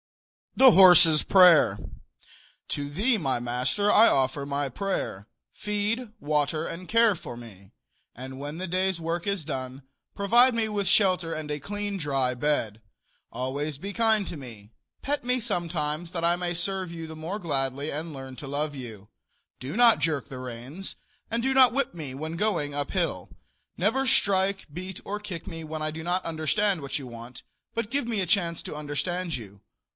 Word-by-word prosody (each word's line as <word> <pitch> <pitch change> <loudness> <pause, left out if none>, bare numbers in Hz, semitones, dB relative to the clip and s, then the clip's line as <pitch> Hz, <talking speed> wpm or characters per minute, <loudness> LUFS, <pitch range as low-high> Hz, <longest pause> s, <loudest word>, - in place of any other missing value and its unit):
THE 260 -1 +8
HORSE'S 175 -5 +8
PRAYER. 175 - +6 0.9
To 145 0 -3
thee, 215 - +1
my 135 - -1
master, 125 +12 0
I 225 +2 +7
offer 135 +1 +1
my 140 0 -1
prayer: 130 - -3 0.3
Feed, 210 +3 -2
water 150 +1 0
and 180 +2 -7
care 230 -2 +4
for 120 -7 -9
me; 100 -5 -12 0.4
and 130 +2 -8
when 145 +3 -6
the 185 +1 -4
day's 185 0 0
work 165 +1 -3
is 200 -6 -1
done, 130 -2 -5 0.3
provide 240 +6 +4
me 230 -1 0
with 205 -2 -2
shelter 185 -5 +3
and 155 -1 -5
a 150 - -2
clean, 205 +5 -4
dry 135 -6 0
bed. 120 -5 -1 0.5
Always 135 +4 -3
be 200 +7 -6
kind 220 -3 +2
to - - -5
me. 115 -7 -10 0.3
Pet 290 -1 -2
me 250 +1 +1
sometimes, 170 -4 -2
that 170 -2 -2
I 170 +1 +3
may 175 0 -2
serve 185 0 -1
you 165 -1 -7
the 160 - -9
more 165 +7 -5
gladly 140 -4 -2
and 160 +3 -4
learn 135 -2 -8
to 145 - -8
love 145 +1 -2
you. 110 -6 -8 0.5
Do 135 - -5
not 240 -2 +6
jerk 155 -4 -1
the 130 - -8
reins, 130 +9 -7 0.3
and 230 +1 -1
do 265 +2 +1
not 260 -2 +6
whip 275 -5 0
me 150 -6 -6
when 155 +4 -5
going 170 -7 -1
up 145 0 -3
hill. - - -1 0.5
Never 225 +9 +1
strike, 195 -4 +2
beat 185 +2 -6
or 205 +1 -3
kick 190 -5 -7
me 165 -1 -6
when 155 0 -6
I 155 - -1
do 160 +1 -7
not 180 +2 -1
understand 165 +4 0
what 140 +1 -3
you 135 - -8
want, 120 +1 -10 0.3
but 230 -1 -3
give 280 -3 -1
me 225 -3 -1
a 190 - +1
chance 170 -2 0
to - - -7
understand 165 +3 -3
you. 100 -4 -12
165 Hz, 180 wpm, -27 LUFS, 140-200 Hz, 0.9 s, THE